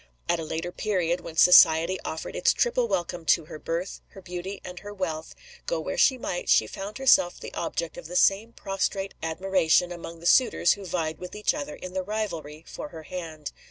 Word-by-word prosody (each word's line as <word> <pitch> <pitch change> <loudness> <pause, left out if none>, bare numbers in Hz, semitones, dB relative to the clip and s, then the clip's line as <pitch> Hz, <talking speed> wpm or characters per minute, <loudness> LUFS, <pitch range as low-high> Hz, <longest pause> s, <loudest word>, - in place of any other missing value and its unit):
At 170 -1 +1
a - - -3
later 165 +3 -4
period, 180 -4 -1
when 165 -1 -9
society 170 +1 +7
offered 160 - -5
its - - +3
triple 485 0 +1
welcome 175 - -2
to 165 -1 +3
her 155 - -9
birth, 170 +5 -4
her 195 - -11
beauty, 180 +2 -6
and 180 0 -7
her 205 - -9
wealth 165 -6 -4 0.3
go - - 0
where - - -4
she 260 - +4
might, 180 -7 -4
she - - +5
found 195 - -7
herself 260 -9 +4
the - - -9
object 170 -1 -3
of - - -10
the 180 - -8
same 200 +5 +3
prostrate 195 -1 -2
admiration 175 +1 +2
among 170 -1 -8
the 170 - -12
suitors 205 -4 +4
who 200 -2 -9
vied 160 -3 -2
with 180 +2 -8
each 210 - +1
other 295 0 -5
in 185 -7 -9
the 190 - -1
rivalry 170 -7 -4
for - - -7
her 160 -1 -10
hand. 160 -3 -7
180 Hz, 200 wpm, -26 LUFS, 165-195 Hz, 0.3 s, society